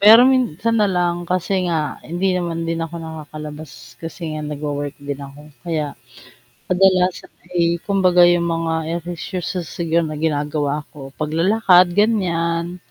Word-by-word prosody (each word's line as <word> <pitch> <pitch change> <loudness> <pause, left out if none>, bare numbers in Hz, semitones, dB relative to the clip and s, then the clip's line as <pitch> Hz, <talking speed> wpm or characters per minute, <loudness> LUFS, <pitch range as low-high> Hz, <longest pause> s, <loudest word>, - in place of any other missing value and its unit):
pero 225 +4 +9
minsan 235 -5 +2
nalang 175 -3 0
kasi 185 +1 -1 0.2
nga 155 -3 -2
hindi 180 +4 -1
naman 170 -2 -2
din 165 0 -2
ako 165 0 -4
nakakalabas 155 -5 -9
kasi 165 +2 -8
nga 155 - -4
nag-wo-work 145 -1 -4
din 140 -1 -6
ako 140 +1 -10 0.2
kaya 160 -1 -2 0.8
kadalasan 185 0 +2 0.2
ay 170 0 +2
kumbaga 185 -3 +5
yung 175 0 +3
mga 165 0 -1 0.3
ehersisyo 175 +1 -4
siguro 170 0 -1
na 155 -1 -4
ginagawa 150 -1 -1
ko, 135 -2 -11
paglalakad 180 +4 +4
ganyan, 175 -5 +1
170 Hz, 130 wpm, -20 LUFS, 155-180 Hz, 0.8 s, pero